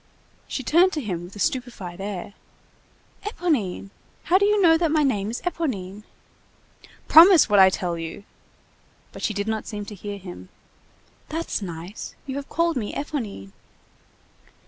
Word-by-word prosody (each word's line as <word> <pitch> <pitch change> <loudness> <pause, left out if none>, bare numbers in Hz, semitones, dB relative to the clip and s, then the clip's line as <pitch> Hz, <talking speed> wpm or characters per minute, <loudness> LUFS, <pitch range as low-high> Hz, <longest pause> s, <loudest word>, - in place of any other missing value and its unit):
She 265 - -4
turned 345 +9 +4
to 310 - -1
him 180 -8 -4
with 180 - -13
a - - -9
stupefied 205 -6 -3
air. 200 -1 -5 0.9
"Éponine! 280 - -2 0.3
How 370 +2 +4
do 400 - +3
you 420 0 +3
know 335 -4 +6
that 330 0 +1
my 305 0 +2
name 210 -7 0
is 235 - -4
Éponine?" 215 - -3 1.0
"Promise 340 -1 +8
what 205 -1 +5
I 190 0 +8
tell 175 -2 -3
you!" 165 +4 -7 0.9
But - - -10
she 215 - -1
did 205 +1 -2
not 220 -1 -2
seem 205 -1 -5
to 210 - -9
hear 205 +1 -6
him. 175 - -10 0.8
"That's 325 -6 -3
nice! 175 +2 -7
You 270 0 -4
have 280 - -6
called 335 -2 +1
me 215 -4 -3
Éponine!" 230 - -5
215 Hz, 155 wpm, -24 LUFS, 190-310 Hz, 1.0 s, Promise